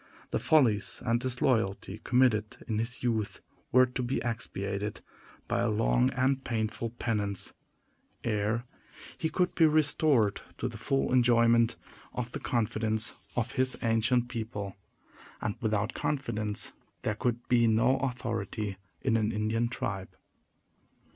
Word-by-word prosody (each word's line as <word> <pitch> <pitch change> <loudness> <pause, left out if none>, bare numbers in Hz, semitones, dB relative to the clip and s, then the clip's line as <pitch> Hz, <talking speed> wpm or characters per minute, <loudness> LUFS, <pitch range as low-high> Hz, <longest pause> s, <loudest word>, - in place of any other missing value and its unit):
The - - +1
follies 120 -10 +3
and 115 0 +2
disloyalty 115 -6 0
committed 120 -5 +2
in 110 -2 -1
his 115 +2 -2
youth 110 -4 -1 0.3
were 130 0 +7
to 125 +1 -4
be 125 +2 -1
expiated 105 -3 -3 0.5
by - - 0
a 120 - +2
long 115 +4 +3
and 130 +1 +1
painful 115 0 -2
penance, 105 -4 +1 0.7
ere 110 +2 0 0.5
he 160 - 0
could 180 +1 +1
be 165 - +5
restored 145 -8 +3 0.2
to 125 - -1
the 115 -3 -7
full 135 +1 0
enjoyment 115 -2 +4 0.4
of 125 -1 -4
the - - -4
confidence 110 -1 -1 0.2
of 120 0 -1
his 130 -1 0
ancient 115 +2 +2
people; 110 -5 -5 0.6
and 105 - -1
without 110 -1 0
confidence 110 -7 -1 0.3
there 105 - +1
could 120 +2 -2
be 120 -2 +4
no 115 +4 +4
authority 115 -5 -3 0.3
in 120 -4 +2
an 110 0 +1
Indian 110 +2 0
tribe. 95 -5 -3
115 Hz, 130 wpm, -30 LUFS, 110-125 Hz, 0.7 s, were